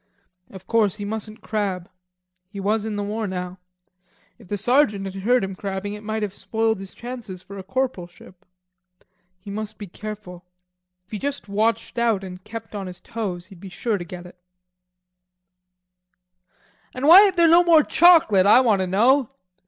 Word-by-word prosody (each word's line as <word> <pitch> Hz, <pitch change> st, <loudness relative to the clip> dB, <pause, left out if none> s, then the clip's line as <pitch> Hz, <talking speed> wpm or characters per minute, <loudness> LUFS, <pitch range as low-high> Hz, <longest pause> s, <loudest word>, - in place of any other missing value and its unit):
Of 190 Hz, -1 st, -12 dB
course 220 Hz, -4 st, +1 dB
he 205 Hz, -1 st, -6 dB
mustn't 215 Hz, +1 st, -5 dB
crab. 195 Hz, -5 st, -2 dB, 0.6 s
He 200 Hz, -, -8 dB
was 210 Hz, +2 st, 0 dB
in 220 Hz, -1 st, -3 dB
the 205 Hz, -, -2 dB
war 215 Hz, +1 st, -3 dB
now. 180 Hz, -1 st, -5 dB, 0.8 s
If 220 Hz, -, -16 dB
the 205 Hz, -, -3 dB
sergeant 215 Hz, -2 st, +2 dB
had 190 Hz, -, -6 dB
heard 245 Hz, +3 st, +2 dB
him 195 Hz, 0 st, -4 dB
crabbing, 195 Hz, +1 st, -5 dB
it 210 Hz, -, -8 dB
might 220 Hz, 0 st, -3 dB
have 200 Hz, -2 st, -3 dB
spoiled 220 Hz, 0 st, -1 dB
his 195 Hz, -1 st, -10 dB
chances 235 Hz, -7 st, -8 dB
for 200 Hz, +2 st, -10 dB
a -, -, -8 dB
corporalship. 185 Hz, -7 st, -5 dB, 0.9 s
He 190 Hz, +2 st, -10 dB
must 215 Hz, +1 st, -6 dB
be 205 Hz, -, -7 dB
careful. 195 Hz, -2 st, -9 dB, 0.6 s
If -, -, -36 dB
he 210 Hz, -, -4 dB
just 280 Hz, -3 st, -4 dB
watched 225 Hz, +4 st, -1 dB
out 225 Hz, -5 st, +1 dB
and 185 Hz, -1 st, -9 dB
kept 225 Hz, +1 st, -9 dB
on 200 Hz, -2 st, -5 dB
his 180 Hz, -1 st, -10 dB
toes, 200 Hz, -7 st, -5 dB
he'd 190 Hz, -2 st, -15 dB
be 195 Hz, +1 st, -10 dB
sure 205 Hz, +3 st, -2 dB
to -, -, -5 dB
get 175 Hz, +1 st, -9 dB
it. 180 Hz, 0 st, -15 dB, 2.6 s
"And 260 Hz, +3 st, -1 dB
why 365 Hz, +5 st, +10 dB
ain't 380 Hz, -, -2 dB
there 340 Hz, -1 st, +5 dB
no 340 Hz, +2 st, +6 dB
more 330 Hz, -3 st, +5 dB
chocolate, 310 Hz, -, +5 dB
I 215 Hz, -, +7 dB
want 220 Hz, -6 st, +2 dB
to 185 Hz, -, -1 dB
know?" 245 Hz, +8 st, +3 dB
210 Hz, 175 wpm, -23 LUFS, 190-230 Hz, 2.6 s, why